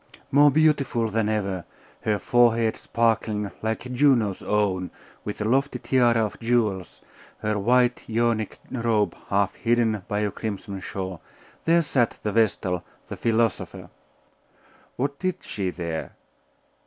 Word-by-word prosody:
More 145 +2 +7
beautiful 140 -6 +2
than 110 0 +1
ever, 100 -4 -1 0.4
her 105 -1 +1
forehead 115 -1 +3
sparkling, 110 -3 0
like 110 0 -1
Juno's 125 -6 +2
own, 95 -3 0 0.3
with 105 - -5
a - - 0
lofty 135 +6 +1
tiara 120 -3 +3
of 105 - -7
jewels, 115 -6 -1 0.4
her 105 -1 0
white 125 +3 +2
Ionic 115 -1 0
robe 110 -6 +1
half 100 0 +2
hidden 115 -3 +1
by 105 0 -1
a 105 -1 0
crimson 100 -1 -5
shawl, 95 -2 -5 0.4
there 170 +1 +4
sat 125 -6 +1
the 105 - -1
vestal, 95 -5 +1 0.3
the - - -4
philosopher. 115 -2 -1 1.0
What 140 +2 -2
did 185 -1 0
she 95 -3 -3
there? 85 -3 -5
110 Hz, 130 wpm, -25 LUFS, 100-120 Hz, 1.0 s, More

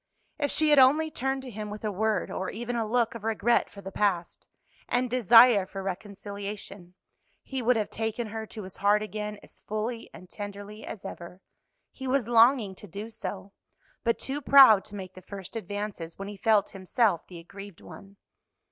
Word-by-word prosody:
If 290 -1 0
she 310 +1 +3
had 295 - +7
only 300 +5 +5
turned 270 0 -2
to 255 - -8
him 210 0 -6
with 210 +1 -8
a 210 - 0
word, 210 -1 -1
or 190 - -3
even 240 +2 -4
a 225 -2 -1
look 235 0 +1
of 230 -3 -9
regret 225 +1 +1
for 200 - -12
the 195 0 -8
past, 185 -4 -1 0.4
and 250 +1 +1
desire 235 -3 +6
for 195 0 -7
reconciliation, 200 -1 -7 0.5
he 265 -2 -4
would 245 +1 +3
have 215 -2 -1
taken 225 +1 -2
her 220 0 -6
to 215 - -7
his 185 0 -9
heart 205 +1 +3
again 210 0 -5
as - - -15
fully 225 +2 -4
and 185 - -13
tenderly 205 +2 -8
as 200 - -8
ever. 180 -1 -8 0.5
He 265 - -7
was 260 -3 +1
longing 235 -3 +4
to 205 - -11
do 205 +5 -7
so, 195 -2 -7 0.5
but 230 - +1
too 280 +2 -4
proud 265 -8 +8
to 205 - -9
make 190 -2 -7
the 185 - -12
first 195 +2 -9
advances 205 -6 -5
when 195 - -6
he 205 - -7
felt 205 0 +2
himself 195 -1 0
the 180 - -10
aggrieved 195 +2 -11
one. 200 0 -13
210 Hz, 190 wpm, -28 LUFS, 195-235 Hz, 0.5 s, proud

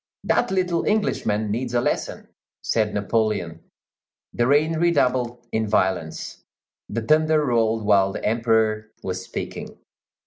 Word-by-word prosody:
"That - - +1
little 180 -3 0
Englishman 110 - 0
needs 120 +2 -2
a - - +4
lesson," - - -2 0.4
said 110 -2 +1
Napoleon. 105 -6 -1 0.7
The 120 - +1
rain 155 +3 +2
redoubled 125 -8 +1
in 110 0 0
violence; 95 -6 -1 0.5
the 115 - -3
thunder 155 +3 +3
rolled 115 -3 +1
while 100 -2 +4
the - - -5
Emperor 110 -1 +1
was 95 0 -3
speaking. - - -7
115 Hz, 125 wpm, -23 LUFS, 105-140 Hz, 0.7 s, a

